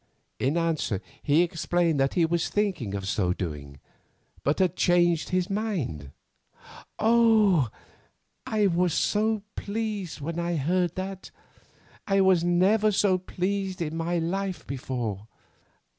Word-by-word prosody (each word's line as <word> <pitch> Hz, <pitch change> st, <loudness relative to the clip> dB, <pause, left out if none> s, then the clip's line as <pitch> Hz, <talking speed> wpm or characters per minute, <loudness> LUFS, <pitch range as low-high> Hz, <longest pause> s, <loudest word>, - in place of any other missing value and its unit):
In 140 Hz, +6 st, +1 dB
answer 160 Hz, -, 0 dB, 0.2 s
he 150 Hz, +4 st, +3 dB
explained 170 Hz, -2 st, 0 dB
that 135 Hz, 0 st, +1 dB
he 170 Hz, -, +4 dB
was 170 Hz, +1 st, 0 dB
thinking 180 Hz, -, -1 dB
of 95 Hz, -1 st, -4 dB
so 90 Hz, -3 st, +1 dB
doing, 75 Hz, -6 st, -6 dB, 0.6 s
but 145 Hz, -, +1 dB
had 185 Hz, -4 st, +1 dB
changed 175 Hz, -2 st, +2 dB
his 185 Hz, -1 st, 0 dB
mind. 185 Hz, -, -3 dB, 0.9 s
Oh! 220 Hz, -, +4 dB, 0.8 s
I 215 Hz, -1 st, +1 dB
was 180 Hz, 0 st, +1 dB, 0.4 s
pleased 205 Hz, -5 st, -4 dB
when 165 Hz, +4 st, -4 dB
I 170 Hz, 0 st, -1 dB
heard 175 Hz, +3 st, 0 dB
that. 190 Hz, 0 st, -5 dB, 0.8 s
I 195 Hz, -1 st, +3 dB
was 190 Hz, -3 st, +4 dB
never 195 Hz, +5 st, +3 dB
so 190 Hz, -2 st, +2 dB
pleased 190 Hz, +1 st, -3 dB
in 160 Hz, -2 st, -3 dB
my 165 Hz, +1 st, -1 dB
life 180 Hz, 0 st, -2 dB
before. 120 Hz, -6 st, -4 dB
175 Hz, 125 wpm, -26 LUFS, 145-195 Hz, 0.9 s, he